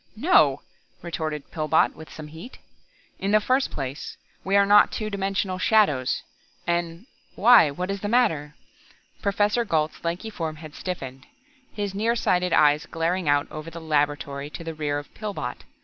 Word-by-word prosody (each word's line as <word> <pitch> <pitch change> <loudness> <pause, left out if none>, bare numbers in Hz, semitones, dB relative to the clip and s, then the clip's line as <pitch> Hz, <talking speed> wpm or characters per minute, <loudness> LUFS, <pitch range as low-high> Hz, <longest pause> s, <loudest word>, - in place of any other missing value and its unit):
"No!" 345 +11 +4 0.4
retorted 155 -4 -4
Pillbot 155 0 +2
with 160 - -12
some 155 -1 -9
heat. 165 +11 -11 0.6
"In 195 - -2
the 215 +1 +5
first 255 +5 +1
place, 135 +1 -6 0.3
we 195 +1 0
are 200 0 +6
not 205 +1 +6
two 215 -1 -4
dimensional 195 -1 -1
shadows, 185 - +2 0.4
and 170 +2 -2 0.3
why, 230 -7 +7
what 180 +7 -4
is 200 -1 -4
the 205 - -2
matter?" 165 -11 +1 0.7
Professor 205 +3 +1
Gault's 160 -7 -1
lanky 175 +6 -3
form 160 -6 -4
had 155 -1 -11
stiffened, 135 -9 -6 0.4
his 205 -2 -4
near 225 +4 +1
sighted 180 -5 +1
eyes 150 -1 +4
glaring 165 0 -1
out 145 0 +3
over 155 +1 -7
the 165 +1 -9
laboratory 145 -2 -1
to 165 - -8
the 165 0 -5
rear 150 -2 -2
of 145 - -8
Pillbot. 205 - -5
170 Hz, 160 wpm, -25 LUFS, 150-205 Hz, 0.7 s, why